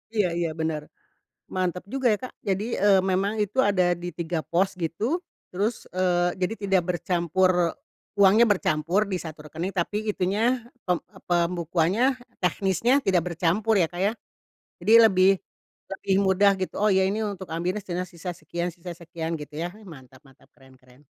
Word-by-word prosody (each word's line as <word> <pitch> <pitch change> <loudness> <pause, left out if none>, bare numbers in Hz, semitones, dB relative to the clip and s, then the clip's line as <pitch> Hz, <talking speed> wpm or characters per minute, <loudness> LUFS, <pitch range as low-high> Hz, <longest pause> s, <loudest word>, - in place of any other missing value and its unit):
Iya 205 -4 +3
iya 170 -2 0
benar, 160 -1 -1 0.7
mantap 180 -1 -1
juga 265 -1 -3
ya, - - 0
Kak. 255 - -7 0.2
Jadi, 195 +3 0
eee, 195 -1 +5
memang 190 +2 0
itu 210 +5 -3
ada 180 -3 +2
di 175 -1 -6
3 170 0 -3
pos 185 +3 +1
gitu. 195 - -1 0.3
Terus, 210 +5 -2
eee, 180 -1 +1
jadi 185 +5 0 0.2
tidak 190 -2 +4
bercampur 175 0 +1 0.4
uangnya 205 +3 +6
bercampur 185 -2 +1
di 185 - -1
1 160 -3 -8
rekening, 170 +6 -4
tapi 205 +4 -2
itunya, 195 +3 -1 0.4
pem 180 -2 +2
e 190 0 -20
pembukuannya, 175 +3 +1 0.4
teknisnya 195 +6 +1
tidak 185 -6 +2
bercampur 185 +7 +1
ya, 165 - +2
Kak, 175 +1 -6
ya. 210 - +2 0.7
Jadi 210 +6 +2
lebih 190 -2 +5 0.6
lebih 195 0 -1
mudah 195 +1 +5
gitu, 185 - -3
"Oh - - +4
ya, 190 0 +4
ini 210 +3 -1
untuk 190 -2 -6
ambilnya 180 +5 -1
setengah, 180 0 -3
sisa 175 +1 -6
sekian 170 +3 -4
sisa 175 +1 -9
sekian," 170 -1 -5
gitu 150 0 -10
ya. 175 - -2
Ih, 220 - -16
mantap 130 -5 -13
mantap, 135 0 -21
keren 130 -1 -19
keren. 125 +3 -22
180 Hz, 165 wpm, -25 LUFS, 170-195 Hz, 0.7 s, uangnya